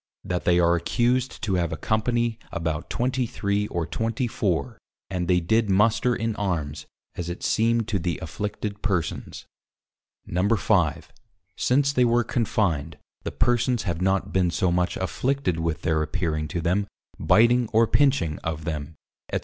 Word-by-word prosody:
That 90 Hz, -1 st, -3 dB
they 90 Hz, 0 st, +4 dB
are 85 Hz, 0 st, +4 dB
accused 120 Hz, +8 st, 0 dB
to 100 Hz, -, 0 dB
have 85 Hz, -, -2 dB
a 80 Hz, -, -3 dB
Company 115 Hz, +5 st, 0 dB
about 80 Hz, -2 st, -3 dB
23 115 Hz, -5 st, -1 dB
or 85 Hz, -4 st, -2 dB
24 115 Hz, -, -2 dB, 0.3 s
and 90 Hz, -2 st, -2 dB
they 90 Hz, 0 st, +4 dB
did 110 Hz, +5 st, +1 dB
Muster 110 Hz, +5 st, +3 dB
in 115 Hz, -1 st, -2 dB
Armes, 80 Hz, -7 st, -2 dB, 0.3 s
as 85 Hz, -1 st, -5 dB
it 85 Hz, -, -6 dB
seemed 115 Hz, 0 st, +2 dB
to 100 Hz, -3 st, 0 dB
the 85 Hz, 0 st, -2 dB
Afflicted 105 Hz, +4 st, -5 dB
Persons. 95 Hz, -6 st, -2 dB, 0.8 s
5. 95 Hz, -3 st, +1 dB, 0.4 s
Since 140 Hz, +2 st, +2 dB
they 125 Hz, -, +3 dB
were 120 Hz, 0 st, +3 dB
confined, 90 Hz, -, -1 dB, 0.2 s
the -, -, -4 dB
Persons 120 Hz, 0 st, +1 dB
have 85 Hz, -3 st, -3 dB
not 95 Hz, +1 st, 0 dB
been 90 Hz, -2 st, +3 dB
so 90 Hz, +1 st, +1 dB
much 90 Hz, 0 st, 0 dB
Afflicted 130 Hz, -11 st, -1 dB
with 80 Hz, 0 st, -2 dB
their 80 Hz, -1 st, +1 dB
appearing 80 Hz, -1 st, -1 dB
to 85 Hz, +3 st, -3 dB
them, 95 Hz, +5 st, +1 dB, 0.3 s
Biteing 120 Hz, +1 st, +4 dB
or 115 Hz, +1 st, +5 dB
Pinching 130 Hz, -, +2 dB
of 80 Hz, -1 st, -4 dB
them 75 Hz, -1 st, -4 dB, 0.4 s
&c. -, -, 0 dB
100 Hz, 150 wpm, -25 LUFS, 85-115 Hz, 0.8 s, or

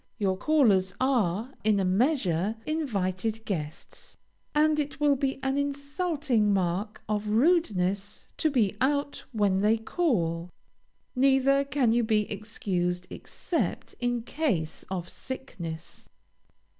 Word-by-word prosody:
Your 195 Hz, -4 st, +1 dB
callers 200 Hz, -7 st, +3 dB
are, 240 Hz, -2 st, +1 dB
in 210 Hz, -1 st, +3 dB
a 190 Hz, -, +1 dB
measure, 200 Hz, -, +1 dB
invited 225 Hz, -, -2 dB
guests, 155 Hz, -7 st, -6 dB, 0.4 s
and 305 Hz, 0 st, +4 dB
it 290 Hz, 0 st, -3 dB
will 295 Hz, -1 st, +4 dB
be 270 Hz, 0 st, -1 dB
an 270 Hz, +1 st, +1 dB
insulting 285 Hz, -, 0 dB
mark 195 Hz, +2 st, -1 dB
of 210 Hz, 0 st, -1 dB
rudeness 210 Hz, -, +1 dB
to 315 Hz, -, +2 dB
be 225 Hz, -8 st, +1 dB
out 285 Hz, +2 st, 0 dB
when 205 Hz, -5 st, +2 dB
they 215 Hz, +2 st, +4 dB
call. 180 Hz, -, 0 dB, 0.7 s
Neither 270 Hz, +1 st, +4 dB
can 275 Hz, -4 st, +1 dB
you 235 Hz, +1 st, +3 dB
be 220 Hz, -1 st, +3 dB
excused, 185 Hz, -4 st, -2 dB
except 340 Hz, -, -3 dB
in 245 Hz, -1 st, -1 dB
case 225 Hz, -, -2 dB
of 180 Hz, -2 st, -3 dB
sickness. 170 Hz, -12 st, -7 dB
225 Hz, 120 wpm, -28 LUFS, 190-275 Hz, 0.7 s, and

